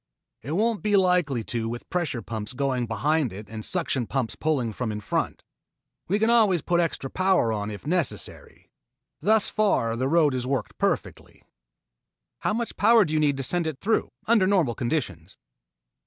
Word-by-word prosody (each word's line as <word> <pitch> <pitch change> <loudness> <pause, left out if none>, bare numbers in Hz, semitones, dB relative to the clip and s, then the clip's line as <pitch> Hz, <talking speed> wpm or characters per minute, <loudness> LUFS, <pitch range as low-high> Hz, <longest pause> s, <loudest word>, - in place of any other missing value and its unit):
"It 140 +6 -5
won't 220 +3 +1
be 210 -1 +3
likely 180 -10 +2
to 115 0 -3
with 120 +1 -6
pressure 160 - -2
pumps 110 +1 -5
going 130 -2 -1
behind 140 +5 0
it 100 +2 -9
and 110 +1 -7
suction 140 - -1
pumps 130 -5 -2
pulling 135 -8 -1
from 115 0 -3
in 105 - -4
front. 105 - -2 0.6
We 200 - +1
can 220 +2 +2
always 210 -9 +4
put 175 -1 +1
extra 165 -5 -1
power 185 -8 +2
on 105 -1 -3
if 105 +3 -8
necessary. 150 - -3 0.5
Thus 215 0 +3
far 155 - +1
the 130 +3 -1
road 155 -2 +3
has 125 -1 -2
worked 130 -5 -3
perfectly." - - -2 1.0
"How - - 0
much 235 0 -3
power 225 0 +5
do 155 - -4
you 155 - +2
need 145 -2 +2
to 135 - -3
send 170 +5 0
it 155 -4 -3
through, 220 +3 0 0.2
under 220 -4 +4
normal 180 -11 +2
conditions?" 110 - -3
145 Hz, 175 wpm, -25 LUFS, 115-185 Hz, 1.0 s, power